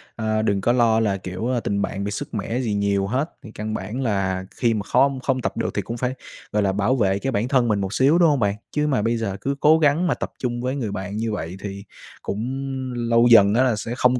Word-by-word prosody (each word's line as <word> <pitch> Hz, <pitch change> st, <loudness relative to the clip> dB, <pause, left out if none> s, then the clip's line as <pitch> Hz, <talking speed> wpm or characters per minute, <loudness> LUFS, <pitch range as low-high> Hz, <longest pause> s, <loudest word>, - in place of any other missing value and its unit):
Ơ, 110 Hz, -1 st, 0 dB
đừng 100 Hz, -3 st, 0 dB
có 120 Hz, -, +2 dB
lo 115 Hz, -2 st, +3 dB
là, 100 Hz, -3 st, +1 dB
kiểu, 90 Hz, +4 st, -5 dB, 0.2 s
tình 100 Hz, 0 st, -1 dB
bạn 100 Hz, 0 st, -3 dB
bị 100 Hz, -, -3 dB
sứt 105 Hz, -, -5 dB
mẻ 115 Hz, +3 st, -2 dB
gì 115 Hz, -5 st, -1 dB
nhiều 100 Hz, -1 st, +1 dB
hết, 130 Hz, +9 st, -1 dB
thì 110 Hz, -, -10 dB
căn 110 Hz, 0 st, -5 dB
bản 110 Hz, +5 st, -4 dB
là 95 Hz, -5 st, -1 dB
khi 120 Hz, -2 st, +1 dB
mà 105 Hz, -, -1 dB
khom 135 Hz, +6 st, +2 dB
không 130 Hz, 0 st, -1 dB
tập -, -, -3 dB
được -, -, -1 dB
thì -, -, -1 dB
cũng 115 Hz, -, -6 dB
phải, 125 Hz, +1 st, -1 dB, 0.4 s
gọi 105 Hz, 0 st, +1 dB
là, 95 Hz, -, +2 dB
bảo 100 Hz, +6 st, +1 dB
vệ 100 Hz, -5 st, +1 dB
cái 135 Hz, +5 st, -2 dB
bản 110 Hz, +1 st, 0 dB
thân 130 Hz, -2 st, +2 dB
mình 105 Hz, -3 st, +1 dB
một 95 Hz, +2 st, -3 dB
xíu, 140 Hz, +5 st, +4 dB
đúng 170 Hz, -2 st, +5 dB
hông 145 Hz, -2 st, +2 dB
bạn? 100 Hz, -2 st, +1 dB, 0.2 s
Chứ 150 Hz, 0 st, 0 dB
mà 135 Hz, -7 st, +1 dB
bây 115 Hz, +2 st, 0 dB
giờ 100 Hz, -4 st, -3 dB
cứ 140 Hz, +1 st, -1 dB
cố 155 Hz, +3 st, +5 dB
gắng 155 Hz, +3 st, +3 dB
mà 160 Hz, -, +2 dB
tập -, -, -5 dB
chung 120 Hz, -1 st, -2 dB
với 130 Hz, +2 st, -2 dB
người 120 Hz, -7 st, -3 dB
bạn 100 Hz, +1 st, -5 dB
như 110 Hz, 0 st, -1 dB
vậy 90 Hz, -3 st, -4 dB
thì 100 Hz, -1 st, -6 dB, 0.4 s
cũng 105 Hz, +3 st, -3 dB, 0.5 s
lâu 115 Hz, 0 st, +3 dB
dần 100 Hz, -3 st, +7 dB
á 125 Hz, +4 st, +4 dB
là 125 Hz, -4 st, +2 dB
sẽ 105 Hz, +2 st, -5 dB
không 125 Hz, 0 st, +3 dB
110 Hz, 265 wpm, -22 LUFS, 100-125 Hz, 0.5 s, dần